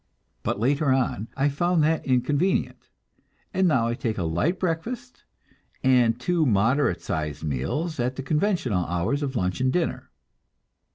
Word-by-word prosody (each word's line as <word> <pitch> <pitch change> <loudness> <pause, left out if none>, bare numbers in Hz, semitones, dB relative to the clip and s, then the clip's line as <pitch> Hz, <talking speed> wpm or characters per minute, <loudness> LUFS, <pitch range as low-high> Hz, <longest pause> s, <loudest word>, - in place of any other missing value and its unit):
But - - -2
later 140 +5 +1
on 125 -5 0
I 135 +1 +3
found 170 +3 +1
that 160 0 +1
inconvenient, 145 +8 0 0.6
and 190 0 +3
now 125 -8 +2
I 115 - 0
take 115 -3 -3
a 90 - -1
light 85 - 0
breakfast, 230 +9 -4 0.6
and 125 -3 +4
two 170 +5 +1
moderate 125 +3 +2
sized 75 -1 -3
meals 80 - -2
at 125 +2 0
the 135 - -5
conventional 150 - 0
hours 90 - -1
of 140 -2 -3
lunch 90 -1 -1
and 130 0 +2
dinner. 170 +3 -2
130 Hz, 150 wpm, -25 LUFS, 115-160 Hz, 0.6 s, and